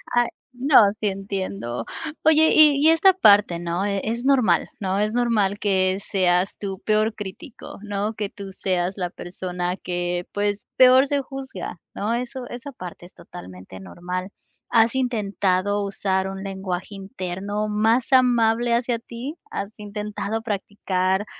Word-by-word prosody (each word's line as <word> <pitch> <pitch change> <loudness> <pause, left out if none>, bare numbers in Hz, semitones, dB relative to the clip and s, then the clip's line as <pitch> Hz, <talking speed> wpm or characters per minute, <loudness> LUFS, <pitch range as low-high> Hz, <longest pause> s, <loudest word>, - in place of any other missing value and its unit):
Ah, 240 -1 +4 0.3
no, 270 +3 0 0.2
sí, 215 - 0
entiendo. 190 - -4 0.4
Oye, 315 0 +5
y 300 -2 +7
y - - +8
esta 350 +4 +5
parte, 205 - +5
¿no? 175 +3 -2
E 200 -1 -1
es 235 +3 -3
normal, 255 -11 +3
¿no? 195 0 -1
Es 210 +1 +1
normal 220 -4 +1
que 190 -2 +1
seas 185 -1 +1
tu 195 -2 -5
peor 215 +1 +1
crítico, 205 +4 -9
¿no? 205 +1 -2
Que 210 -2 -3
tú 195 -1 -9
seas 185 0 -1
la 180 -2 -2
persona 180 0 -4
que, 175 0 -3
pues 205 0 -1
peor 260 +1 +7
se 285 0 0
juzga, 265 -10 -7
¿no? 215 +3 -2
Eso 245 +1 -4
esa 250 +4 -7
parte 180 -6 -9
es 180 - -16
totalmente 90 +1 -11
normal. 180 - -5 0.4
¿Has 230 +1 +3
intentado 205 -5 0
usar 190 -1 -1
un 195 0 -6
lenguaje 190 0 -5
interno 195 +1 -4
más 225 +5 +1
amable 240 -2 +3
hacia 240 -1 0
ti? 245 +6 -7 0.2
¿Has 200 - -4
intentado 210 +1 -4
practicar, 195 -2 -1
205 Hz, 145 wpm, -23 LUFS, 185-235 Hz, 0.4 s, y